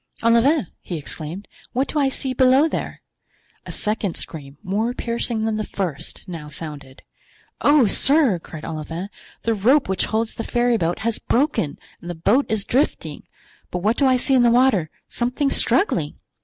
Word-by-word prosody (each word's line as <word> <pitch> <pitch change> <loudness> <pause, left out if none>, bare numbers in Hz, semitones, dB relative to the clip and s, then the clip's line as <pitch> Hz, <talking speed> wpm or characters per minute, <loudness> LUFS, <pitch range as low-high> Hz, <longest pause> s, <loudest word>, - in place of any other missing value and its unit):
"Olivain!" 235 - +4 0.2
he 175 - -5
exclaimed, 160 +5 -7 0.3
"what 265 +3 +1
do 300 - -1
I 275 -2 +3
see 265 0 -2
below 260 +4 +5
there?" - - -5 0.6
A - - -5
second 210 -4 -2
scream, 140 -3 -6
more 220 +6 -1
piercing 235 -2 -1
than 220 -1 0
the 215 - -1
first, 185 -3 -5
now 165 -4 -7
sounded. 145 -3 -8 0.6
"Oh, 290 -3 +5
sir!" 270 - +4
cried 160 -1 -9
Olivain, 165 +4 -5 0.3
"the 230 - +1
rope 250 +8 +3
which 190 0 0
holds 220 +1 -1
the 225 - -5
ferryboat 230 -9 +1
has 230 -1 0
broken 245 - 0 0.2
and 175 - -8
the 175 - -4
boat 210 - +2
is 215 -2 0
drifting. 275 +7 -1 0.4
But 180 0 -4
what 215 +3 +3
do 275 - +3
I 255 -1 +4
see 270 - +1
in 255 - +5
the 240 - +5
water—something 245 - +1
struggling?" 165 - +1
220 Hz, 165 wpm, -22 LUFS, 175-255 Hz, 0.6 s, below